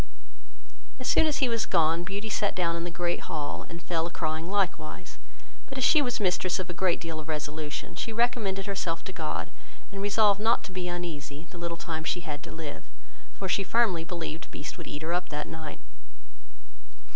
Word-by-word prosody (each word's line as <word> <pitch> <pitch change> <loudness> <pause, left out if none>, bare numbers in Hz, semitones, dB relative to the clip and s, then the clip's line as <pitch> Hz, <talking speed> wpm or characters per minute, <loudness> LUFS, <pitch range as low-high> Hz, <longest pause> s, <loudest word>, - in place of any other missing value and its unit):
As 255 - -3
soon 320 - +6
as 300 - +2
he - - +2
was 230 -2 +1
gone, 165 -1 +4
Beauty 200 +4 -3
sat 205 -1 +1
down 170 -2 +2
in 170 0 -2
the - - -1
great 175 0 -1
hall, 150 -3 -2
and 170 0 -7
fell 165 -1 +1
a - - -4
crying 160 0 -1
likewise; 180 -3 -1 0.5
but 270 - -6
as 265 - +1
she 305 +3 +7
was 245 -4 0
mistress 185 -2 +3
of 185 -2 -2
a - - -5
great 180 0 +2
deal 165 -2 -4
of 155 +1 -7
resolution, 150 0 -3
she 230 - -2
recommended 220 -4 +2
herself 180 -5 -1
to 190 - -6
God, - - -2 0.4
and 195 -1 -4
resolved 205 0 +5
not 230 +2 +4
to 210 - -7
be 185 -1 -2
uneasy 165 -4 -4
the 175 - -8
little 170 0 -2
time 160 -1 -3
she 175 - 0
had 150 -4 -4
to - - -8
live; 160 -3 -6 0.5
for 195 - -3
she 195 +2 +3
firmly 195 -4 +3
believed 165 -2 -4
Beast 145 - -6
would - - -8
eat 145 +1 -4
her 165 +2 0
up 180 0 0
that 150 0 -2
night. 160 -2 -6
175 Hz, 205 wpm, -29 LUFS, 160-200 Hz, 0.5 s, she